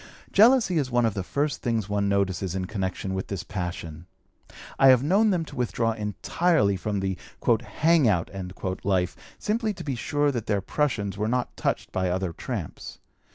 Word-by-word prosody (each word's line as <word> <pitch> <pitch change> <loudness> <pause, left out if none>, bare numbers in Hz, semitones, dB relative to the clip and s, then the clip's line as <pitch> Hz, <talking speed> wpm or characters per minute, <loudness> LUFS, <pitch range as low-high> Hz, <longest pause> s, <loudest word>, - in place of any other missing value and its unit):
Jealousy 220 -5 +5
is 135 -3 -1
one 120 -1 +2
of 110 - +1
the 100 - -2
first 145 +9 -1
things 115 -4 -1
one 100 -1 0
notices 95 -2 0
in 95 -1 -2
connection 95 -1 -3
with 95 0 -3
this 100 -2 -4
passion. 90 -3 -5 0.7
I 135 - +7
have 130 -1 +7
known 200 +8 +4
them 175 -5 +1
to - - -11
withdraw 115 -2 0
entirely 105 - +1
from 100 +1 -2
the 95 -1 -2 0.4
"hang 160 0 +3
out" 90 -6 +1 0.5
life 95 -2 +1 0.2
simply 215 0 -1
to - - -7
be 140 - -2
sure 145 +4 0
that 120 -5 -4
their 105 -2 +1
prushuns 100 -2 -1
were 105 +1 -1
not 125 +2 -1
touched - - -2
by 95 -1 0
other 90 -1 -1
tramps. - - -6
105 Hz, 175 wpm, -26 LUFS, 95-145 Hz, 0.7 s, I